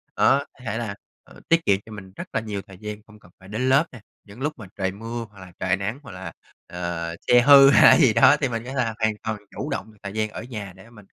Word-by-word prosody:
Đó, 135 - +4
có - - -26
thể 110 +1 -2
là, 110 -4 -4 0.3
ờ, - - -17
tiết 165 0 +3
kiệm 100 -1 +3
cho 110 - -13
mình 95 -3 -10
rất - - -7
là - - +1
nhiều 105 -3 -5
thời 95 -2 -15
gian, 105 +1 -7
không 105 -1 -17
cần 90 - -20
phải 95 - -16
đến 125 +5 -1
lớp 135 +5 +4
nè. 125 - -12 0.2
Những 105 +5 -14
lúc 150 +2 -1
mà 110 - -10
trời 95 -2 -1
mưa 115 +4 -6
hoặc 100 -2 -18
là 90 -1 -12
trời 95 0 +1
nắng 100 +7 -4
hoặc 120 - -11
là, 90 -2 -8 0.4
ờ, 85 -1 -4
xe 120 0 +6
hư 140 +1 +8
hay 140 - +6
là - - +8
gì 130 -9 +5
đó, 115 +6 +6
thì 140 - +2
mình 115 -1 -4
có 130 - -6
là 125 -4 -1
hoàn 110 -1 +1
toàn 110 -1 -3 0.2
chủ - - -4
động 110 - -4
được 105 - -22
thời 100 - -6
gian 110 0 -1
ở - - -8
nhà 105 -6 -7
để 95 +4 -16
mình, 105 -4 -16
110 Hz, 285 wpm, -23 LUFS, 100-120 Hz, 0.4 s, hư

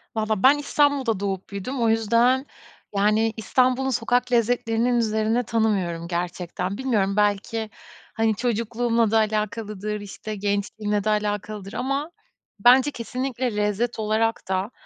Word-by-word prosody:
Valla, 215 -2 -1
ben 275 +3 +7
İstanbul'da 285 -6 +1
doğup 195 -2 -3
büyüdüm. 235 +6 -4
O 230 - +3
yüzden, 235 +4 +3 0.5
yani, 215 +2 +2
İstanbul'un 255 +3 +1
sokak 245 +1 0
lezzetlerinin 235 0 +1
üzerine 220 +1 +1
tanımıyorum, 200 -8 0
gerçekten. 180 +2 -3
Bilmiyorum 210 -7 0
belki, 210 +2 0 0.4
hani, 225 -1 +1
çocukluğumla 230 0 0
da 225 - +4
alakalıdır, 215 -1 -2
işte, 210 +2 -7
gençliğimle 205 +1 -1
de 215 - 0
alakalıdır 210 -1 -2
ama 275 +5 -2 0.5
bence 255 +6 +6
kesinlikle 250 -1 -3
lezzet 210 +3 -1
olarak 220 +1 0
da, 190 +4 -1
220 Hz, 120 wpm, -24 LUFS, 205-245 Hz, 0.5 s, ben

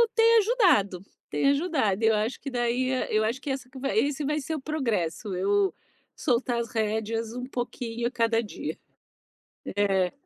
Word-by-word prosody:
tem 460 0 +6
ajudado, 360 - +3 0.3
tem 275 - +2
ajudado. 280 - +1
Eu 220 0 +5
acho 215 +4 -1
que 275 - -6
daí 250 +1 0
a 255 - -1
eu 215 0 +3
acho 235 +5 -1
que 275 - -5
essa 265 -2 -3
que 265 - -10
vai 255 -6 -1
esse 285 +4 +1
vai 300 +2 0
ser 315 +3 -3
o 285 - -5
progresso, 215 - -2
eu 195 -1 +2 0.4
soltar 240 -1 0
as 230 -1 -3
rédeas 220 +1 -1
um 250 0 -5
pouquinho 240 -2 -3
a - - -4
cada 230 -2 +2
dia. 210 - -6 1.0
É. 195 -3 +2
235 Hz, 175 wpm, -27 LUFS, 215-275 Hz, 1.0 s, tem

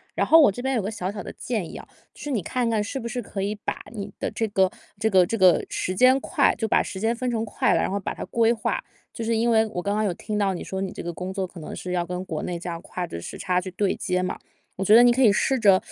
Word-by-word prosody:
然 - - +1
后 325 0 +8
我 285 - +6
这 245 - -7
边 265 +1 0
有 230 - +1
个 200 - -3
小 190 -4 -3
小 205 - -6
的 - - -7
建 215 -9 -4
议 - - -8
啊， - - -11 0.3
就 - - -15
是 295 - -5
你 225 - 0
看 240 +8 -1
看， 220 -2 +1
是 265 +5 -4
不 235 - -5
是 245 +2 -3
可 200 -3 -5
以 205 +2 -1
把 210 - -3 0.2
你 205 -2 -6
的 - - -1
这 225 +1 -1
个 190 -2 +3 0.3
这 220 - +2
个 185 -3 +5
这 225 +6 -2
个 185 -3 +5
时 185 - -2
间 255 +6 +5
块 - - +2
就 225 - -1
把 - - +3
时 190 - -6
间 225 +3 +1
分 250 +1 -2
成 225 -1 -1
块 215 - +1
了， - - +2
然 - - 0
后 200 - -1
把 - - -3
它 - - -6
规 230 -1 +2
划。 235 - -1 0.3
就 230 - -5
是 230 +1 0
因 235 +1 +2
为， 225 -1 +4
我 180 -5 -4
刚 200 +2 -1
刚 215 - +1
有 200 -4 0
听 210 +3 -4
到 200 -2 +1
你 175 - -5
说 190 0 -4
你 190 - -3
这 - - -7
个 175 - -5
工 180 +3 -5
作， 190 -1 -2
可 175 -2 -11
能 - - -7
是 180 0 -5
要 175 -1 0
跟 180 +1 -4
国 160 -4 -4
内 175 -1 -3
这 175 - -6
样 170 0 -5
跨 180 -1 -5
着 85 - -7
时 - - -7
差 180 0 0
去 185 0 -7
对 195 +1 0
接 180 -2 -1
嘛。 185 - -2 0.4
我 190 - -3
觉 205 +3 +4
得 235 - +9
你 245 0 +6
可 260 - +1
以 225 -5 +7
试 265 +5 +1
着 200 -5 +5
205 Hz, 345 characters per minute, -24 LUFS, 185-230 Hz, 0.4 s, 得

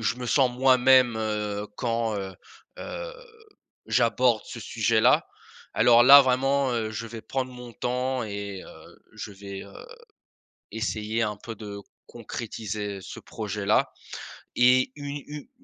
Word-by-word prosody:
je 110 +2 0
me 125 -1 -6
sens 130 +1 +3
moi-même», 130 -1 +4
heu, 105 -1 -3
quand, 115 -2 -1
heu 95 -1 -5 0.4
heu, - - -6 0.7
j'aborde 115 -1 +2
ce - - -9
sujet-là. - - +2 0.5
Alors 120 +1 +6
là, 140 +3 +10
vraiment, 135 +1 +1
heu, 110 -2 -2
je 115 +1 -5
vais 115 0 -8
prendre 130 -1 -3
mon 125 -1 -10
temps 125 +2 -2
et 100 -2 -6
heu, - - -15
je - - -8
vais, 100 0 -8
heu, 100 - -13 0.9
essayer 110 +1 -2
un 105 -1 -2
peu 115 +1 -8
de 100 -1 -8 0.3
concrétiser 105 -3 -6
ce - - -9
projet-là - - -1 0.6
et 125 +1 +4
une 145 0 -5
u 150 -1 -9
115 Hz, 135 wpm, -26 LUFS, 105-130 Hz, 0.9 s, là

